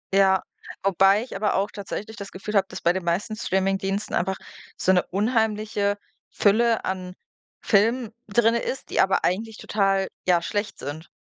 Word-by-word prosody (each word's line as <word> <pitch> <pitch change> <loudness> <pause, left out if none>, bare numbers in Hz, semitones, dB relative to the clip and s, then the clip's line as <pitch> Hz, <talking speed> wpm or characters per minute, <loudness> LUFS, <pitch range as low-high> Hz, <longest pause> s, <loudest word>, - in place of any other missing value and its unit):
Ja, 190 -1 +4 0.4
wobei 195 +2 +4
ich 250 - -9
aber 210 +1 0
auch 200 +2 0
tatsächlich 210 +2 -6
das 200 0 -7
Gefühl 195 +3 -6
habe, 195 -1 +4
dass - - -7
bei 170 - +3
den 190 0 -3
meisten 180 +6 -1
Streamingdiensten 195 0 -1
einfach 190 +2 0 0.4
so 185 - +2
'ne 180 -1 +4
unheimliche 210 -1 0 0.3
Fülle 225 +2 +2
an 185 -1 -4 0.5
Filmen 225 +2 +2 0.2
drin 225 +2 +3
ist, 235 +3 -3
die - - 0
aber 190 0 +2
eigentlich 220 +4 -1
total, 195 -2 +1 0.2
ja, 175 -2 +4
schlecht 205 +1 -2
sind. 155 +4 -7
200 Hz, 160 wpm, -24 LUFS, 190-215 Hz, 0.5 s, Ja